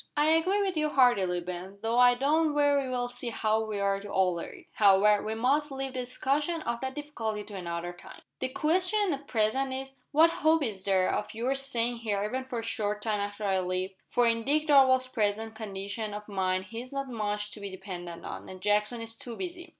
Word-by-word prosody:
"I 300 +1 +4
agree 370 +6 +3
with 380 -2 -1
you 305 -1 +1
heartily, 200 -11 +3
Ben, 180 +2 -7
though 230 +2 +1
I 245 0 +7
don't 300 +4 +2
very 285 -2 +3
well 245 -1 -1
see 245 0 -4
how 220 -1 +1
we 215 -2 -4
are 200 0 +1
to 205 +1 -9
alter 180 -3 +1
it. - - -13
However, 205 0 +5
we 220 +1 -3
must 280 +6 +1
leave 270 -1 -3
the 255 - -3
discussion 290 +6 -1
of 235 0 -3
that 265 0 -4
difficulty 225 -8 -4
to 205 0 -10
another 175 -1 -4
time. 175 - -13 0.2
The 260 - 0
question 365 +7 +2
at 280 0 -7
present 240 +4 +1
is, 270 0 -5 0.2
what 320 +3 +6
hope 320 -1 +2
is 200 -6 -4
there 190 -2 +2
of 210 - -3
your 245 +4 0
staying 245 -3 0
here 210 -3 -1
even 255 +5 -3
for 255 -2 -5
a 225 - -3
short 210 -2 -2
time 215 -2 0
after 205 +1 -4
I 195 -2 +2
leave? 185 +1 -2 0.2
for 245 - +3
in 230 -1 +2
Dick 300 +4 +2
Darvall's 260 -2 +6
present 220 -2 -1
condition 205 0 -5
of 210 0 -8
mind 190 -2 -1
he 230 0 -4
is 255 - -10
not 275 -1 -3
much 210 -3 -3
to - - -8
be 200 -1 -5
depended 180 -3 -7
on, - - -7
and 185 - -9
Jackson 210 +4 +1
is 225 0 -4
too 235 0 -7
busy. 355 -1 -6
230 Hz, 220 wpm, -29 LUFS, 205-270 Hz, 0.2 s, I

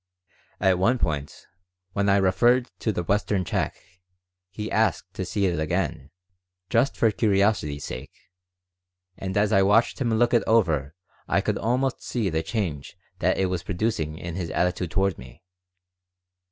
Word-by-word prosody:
At 95 -2 +3
one 115 +7 +3
point, 75 - -3 0.5
when 100 0 +1
I 100 - +5
referred 120 +7 +3
to 110 - 0
the 90 - -2
Western 100 0 0
check, - - -1 0.7
he 105 +3 -6
asked - - 0
to - - -4
see 100 - 0
it 85 -3 0
again, 80 -2 -2 0.6
just 120 +4 +2
for 115 - +3
curiosity's 100 - +1
sake, 65 +2 -7 1.0
and 95 0 -4
as 105 +1 +2
I 95 - +5
watched 105 +7 +3
him 120 -3 +1
look 120 +2 +2
it 120 - +5
over 80 -10 +2 0.3
I - - +2
could - - -1
almost 125 +4 0
see 110 -7 -2
the 80 0 0
change 80 -5 -4 0.2
that - - +2
it 95 - +2
was 90 -2 -2
producing 85 -5 -2
in 85 0 -6
his 85 -2 -4
attitude 90 0 0
toward 95 0 0
me. 65 +7 -13
95 Hz, 155 wpm, -25 LUFS, 85-110 Hz, 1.0 s, I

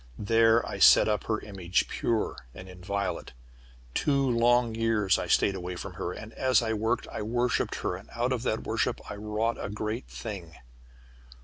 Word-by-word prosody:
There 115 +2 +3
I - - -5
set - - +7
up 105 -1 0
her 110 -1 0
image, 95 -3 -1
pure 115 -2 -1 0.2
and 95 - -10
inviolate. 95 -1 -4 0.6
Two 140 - +1
long 120 -1 +3
years 110 -4 +2
I - - -3
stayed 100 - +3
away 90 -1 -5
from 95 +1 -7
her, 85 0 -4
and 110 +4 -9
as 130 -3 +2
I 110 -1 0
worked, 110 +1 -1
I - - -4
worshipped 120 +3 0
her, - - -1
and 95 +3 -12
out 120 +2 0
of 125 - -2
that 110 -3 -1
worship - - -1
I - - -5
wrought 105 +2 -2
a - - -3
great 110 +3 -4
thing. 95 -8 -7
110 Hz, 180 wpm, -28 LUFS, 100-115 Hz, 0.6 s, set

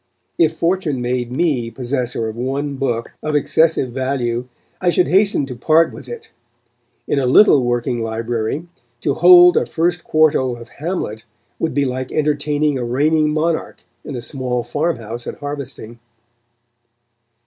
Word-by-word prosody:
If 160 -2 +4
fortune 165 -5 0
made 125 0 -2
me 130 -5 0
possessor 120 -1 -3
of 110 - -6
one 135 +4 -3
book 120 -4 -2
of 155 -1 -2
excessive 150 -2 +2
value, 125 -2 -2 0.3
I 180 - +2
should 175 +1 +2
hasten 195 -6 +3
to 130 -2 -7
part 155 +7 +3
with 130 - -11
it. 120 - -9 0.8
In 140 - +1
a 130 - 0
little 140 0 +6
working 120 0 -1
library, 115 +6 -3 0.3
to 140 - 0
hold 175 +2 +7
a - - +1
first 170 0 -1
quarto 145 -5 +2
of 115 -1 -12
Hamlet, 145 - -4 0.4
would 160 -5 -2
be 140 -1 +2
like 130 0 -4
entertaining 150 -1 0
a - - -2
reigning 150 +6 +1
monarch 160 +2 -2 0.2
in 140 - -7
a 120 - -5
small 125 -4 -2
farmhouse 120 -8 -3
at - - -6
harvesting. 140 -5 -7
135 Hz, 150 wpm, -19 LUFS, 120-155 Hz, 0.8 s, hold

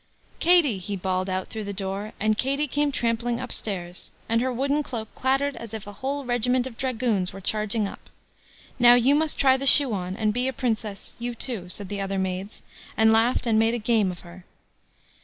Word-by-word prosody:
"Katie", 330 - +4
he 200 +3 -5
bawled 185 0 -2
out 185 0 -3
through 220 -2 -6
the 200 - -4
door; 195 +2 -4
and 215 +1 +2
Katie 275 +6 0
came 290 +1 0
trampling 235 -1 -1
upstairs, 190 -8 -4 0.2
and 230 +1 +1
her 260 +1 0
wooden 275 +4 0
cloak 230 -6 -6
clattered 270 +2 0
as 225 -1 -7
if 215 - -7
a 205 - -9
whole 275 +6 -4
regiment 245 +1 +1
of 260 -3 -7
dragoons 230 -7 0
were 195 - -9
charging 215 +2 0
up. - - -12 0.7
"Now, 240 0 +8
you 245 +3 +4
must 310 +1 +1
try 265 -1 +4
the 275 +1 -2
shoe 270 -3 +8
on, 185 -1 -3
and 215 -2 +1
be 250 +3 0
a 265 - -1
Princess, 220 -5 -3
you 240 0 -4
too," 220 -7 -3
said 200 +2 -3
the 200 +1 -4
other 195 0 -2
maids, 190 +2 -4 0.3
and 220 0 +5
laughed 235 +3 +2
and 220 -2 +3
made 225 0 +1
game 220 -4 +2
of 180 - -7
her. 175 +1 -13
225 Hz, 200 wpm, -25 LUFS, 200-255 Hz, 0.7 s, Now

